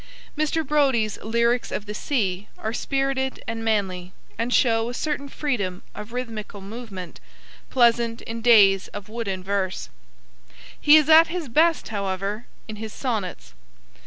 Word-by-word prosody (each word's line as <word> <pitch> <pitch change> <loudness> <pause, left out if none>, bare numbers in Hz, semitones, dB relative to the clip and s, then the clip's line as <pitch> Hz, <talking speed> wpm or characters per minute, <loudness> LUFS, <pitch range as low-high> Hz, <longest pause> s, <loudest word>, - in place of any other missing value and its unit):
Mr. 310 +1 0
Brodie's 265 -7 +2
Lyrics 235 +2 +1
of 205 - -3
the 210 - -6
Sea 205 -6 -1
are 220 - -4
spirited 270 +1 -1
and 225 -1 -3
manly, 185 -5 -1 0.2
and 230 +2 -2
show 230 -2 +3
a 245 - -5
certain 285 -1 -3
freedom 205 -12 -2
of 210 +2 -9
rhythmical 225 -4 -5
movement, 195 -3 -8 0.5
pleasant 235 -2 +2
in 230 0 -6
days 205 -5 +6
of 205 +1 -7
wooden 205 -5 -4
verse. 190 -1 -2 0.9
He 300 +1 +8
is 305 -2 +3
at 320 +1 +8
his 335 -2 -4
best, 320 +7 +2
however, 200 +1 -3 0.2
in 215 -1 -7
his 220 0 -6
sonnets. 195 - -4
225 Hz, 140 wpm, -24 LUFS, 200-265 Hz, 0.9 s, He